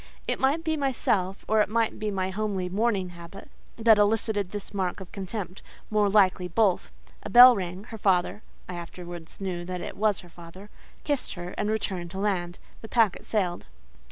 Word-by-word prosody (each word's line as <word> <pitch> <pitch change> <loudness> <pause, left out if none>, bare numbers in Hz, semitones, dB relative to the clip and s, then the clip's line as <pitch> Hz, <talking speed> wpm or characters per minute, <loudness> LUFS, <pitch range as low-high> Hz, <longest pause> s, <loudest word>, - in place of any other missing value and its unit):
It - - -1
might 285 +5 +2
be 320 -1 0
myself, 215 -9 -1
or 215 0 +4
it 210 - +1
might 230 0 0
be 215 0 -2
my 190 -2 -2
homely 195 -2 -2
mourning 200 -1 0
habit, 170 +3 -12 0.3
that 225 -2 +5
elicited 205 -2 +1
this 205 +1 -7
mark 190 -2 -2
of 190 - -10
contempt; 195 -1 -6 0.3
more 210 -1 +3
likely, 190 -3 +3
both. 190 +1 +1 0.3
A - - -7
bell 245 +1 +10
rang; 185 -1 -5
her 225 - -8
father 190 +1 +1 0.3
(I 180 - -6
afterwards 175 -1 -9
knew 185 -3 -3
that 180 0 -4
it - - -6
was 210 -1 +1
her 175 - -15
father) 175 +4 -13 0.3
kissed 285 -7 -2
her, 175 0 -6
and 210 - -1
returned 190 -5 -2
to 190 - -8
land. 180 -4 -1 0.2
The 225 - -8
packet 225 -5 +2
sailed. 185 -5 -1
195 Hz, 185 wpm, -27 LUFS, 180-215 Hz, 0.3 s, bell